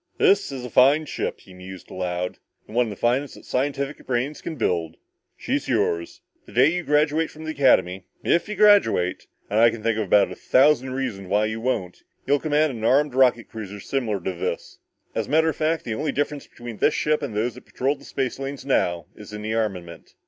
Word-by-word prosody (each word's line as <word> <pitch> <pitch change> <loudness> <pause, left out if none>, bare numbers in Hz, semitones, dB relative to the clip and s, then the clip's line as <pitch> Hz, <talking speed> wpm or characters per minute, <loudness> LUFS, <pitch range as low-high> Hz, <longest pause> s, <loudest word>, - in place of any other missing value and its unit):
"This 405 - +3
is 130 -2 -6
a - - -6
fine 140 +6 +5
ship," - - -4
he 95 - -16
mused 90 0 -11
aloud. 90 0 -3 0.3
"One 120 +2 0
of - - -5
the 105 - -6
finest 125 +6 0
that - - -14
scientific 140 +2 -2
brains 130 +4 -1
can 160 - -5
build. 85 - -1 0.4
She's - - -2
yours. 85 0 -1 0.3
The - - -14
day 130 +6 +5
you 180 - -1
graduate 150 +1 +2
from 155 - -11
the 155 - -3
Academy, 95 - +2 0.2
IF 170 +4 +1
you 210 - -3
graduate, 205 - +4 0.2
and 105 - 0
I 115 +1 +7
can 115 -1 -7
think 115 -1 +1
of 110 - 0
about 100 +1 +4
a - - -6
thousand 130 -1 +3
reasons 115 -8 -4
why 105 +3 +2
you 110 +1 -3
won't, 110 -8 -2 0.2
you'll 145 0 +2
command 150 0 +1
an 110 - -7
armed 140 +4 +3
rocket 125 -3 +3
cruiser 105 -2 -8
similar 110 -3 -2
to 95 +2 -3
this. 85 - -5 0.3
As - - -2
a - - -12
matter 160 +2 +3
of - - -3
fact, 160 +1 -1
the 115 - -2
only 145 +7 -2
difference 145 0 -2
between 120 -2 -9
this 150 - +2
ship 155 0 +1
and 135 -7 -5
those 115 +3 0
that 125 - -14
patrol 135 +3 0
the - - -18
space 135 -1 -3
lanes 135 0 -6
now 85 - +1
is 105 0 -12
in 105 0 -6
the 110 +1 -2
armament." 90 -7 -4
125 Hz, 215 wpm, -24 LUFS, 105-145 Hz, 0.4 s, I